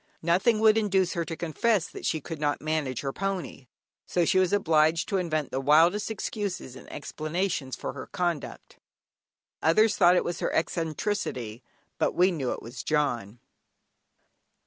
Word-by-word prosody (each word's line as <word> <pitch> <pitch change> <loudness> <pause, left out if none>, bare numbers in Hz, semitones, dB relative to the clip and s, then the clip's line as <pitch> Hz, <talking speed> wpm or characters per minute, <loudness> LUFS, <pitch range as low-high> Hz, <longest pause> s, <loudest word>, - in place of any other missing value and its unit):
Nothing 190 +7 +3
would 220 0 +6
induce 190 -4 +1
her 170 - -1
to 165 - -5
confess 175 +3 +1
that - - -6
she 160 - 0
could 160 +1 -7
not 145 -1 0
manage 155 -5 -2
her 135 -1 -3
pony, 190 -9 -4 0.4
so 175 -1 +1
she 185 - +3
was 185 -2 +2
obliged 165 -4 +3
to 200 - +1
invent 155 -5 -1
the 135 - -2
wildest 165 +10 +4
excuses 200 - -4
and - - -12
explanations 155 -2 -3
for - - -5
her 130 - -8
conduct. 175 -5 -4 0.8
Others 215 +7 +4
thought 180 -1 +6
it - - +2
was 175 - -3
her - - -1
eccentricity, 160 - -2 0.4
but - - +1
we 180 +2 +4
knew 140 -8 -2
it - - -5
was 120 +3 -7
"John." 120 -7 -1
165 Hz, 160 wpm, -27 LUFS, 145-190 Hz, 0.8 s, would